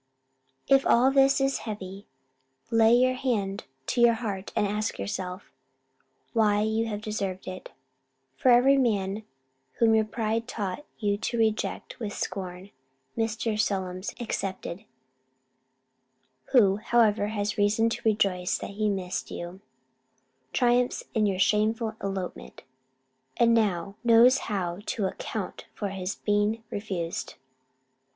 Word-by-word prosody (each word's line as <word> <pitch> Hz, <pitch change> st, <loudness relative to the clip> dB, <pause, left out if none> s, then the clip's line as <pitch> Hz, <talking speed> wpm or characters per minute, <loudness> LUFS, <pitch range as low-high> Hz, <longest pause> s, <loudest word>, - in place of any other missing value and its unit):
If 270 Hz, 0 st, +5 dB
all 255 Hz, +3 st, +4 dB
this 275 Hz, 0 st, +4 dB
is 270 Hz, 0 st, +1 dB
heavy, 195 Hz, -1 st, -7 dB, 0.6 s
lay 225 Hz, 0 st, +5 dB
your 255 Hz, +1 st, +4 dB
hand 220 Hz, -7 st, -2 dB, 0.2 s
to 240 Hz, -, 0 dB
your 235 Hz, -1 st, +6 dB
heart, 205 Hz, -4 st, -4 dB
and 215 Hz, -2 st, +2 dB
ask 210 Hz, +2 st, -2 dB
yourself, 180 Hz, -, -5 dB, 0.8 s
why 210 Hz, -3 st, +3 dB
you 220 Hz, +1 st, 0 dB
have 210 Hz, -1 st, -4 dB
deserved 195 Hz, -4 st, -3 dB
it? 185 Hz, 0 st, -7 dB, 0.7 s
Every 255 Hz, +2 st, +6 dB
man 205 Hz, -4 st, 0 dB, 0.5 s
whom 225 Hz, -1 st, +3 dB
your 220 Hz, -1 st, +3 dB
pride 225 Hz, +1 st, -2 dB
taught 210 Hz, +2 st, -4 dB
you 205 Hz, -2 st, 0 dB
to 235 Hz, -, -2 dB
reject 220 Hz, +2 st, -1 dB
with 210 Hz, -3 st, -4 dB
scorn 185 Hz, 0 st, -5 dB, 0.4 s
(Mr. 225 Hz, -1 st, -1 dB
Solmes 185 Hz, -2 st, -2 dB
excepted, 195 Hz, -3 st, -4 dB, 1.6 s
who, 200 Hz, -6 st, +4 dB
however, 215 Hz, -2 st, +2 dB
has 210 Hz, -1 st, -2 dB
reason 210 Hz, +2 st, +3 dB
to -, -, -3 dB
rejoice 195 Hz, -4 st, +1 dB
that -, -, -7 dB
he 210 Hz, +1 st, 0 dB
missed 185 Hz, -2 st, -3 dB
you) 175 Hz, +2 st, -7 dB, 0.9 s
triumphs 245 Hz, 0 st, +2 dB
in 215 Hz, -2 st, +2 dB
your 195 Hz, -2 st, 0 dB
shameful 220 Hz, +3 st, +1 dB
elopement, 195 Hz, -2 st, -5 dB, 0.7 s
and 235 Hz, -1 st, +4 dB
now 200 Hz, -3 st, +1 dB
knows 240 Hz, +3 st, +6 dB
how 180 Hz, -4 st, -2 dB
to 215 Hz, -6 st, -1 dB
account 190 Hz, -, -5 dB
for 205 Hz, -, -3 dB
his 190 Hz, 0 st, -4 dB
being 210 Hz, +2 st, 0 dB
refused. 185 Hz, -5 st, -4 dB
210 Hz, 125 wpm, -27 LUFS, 195-230 Hz, 1.6 s, your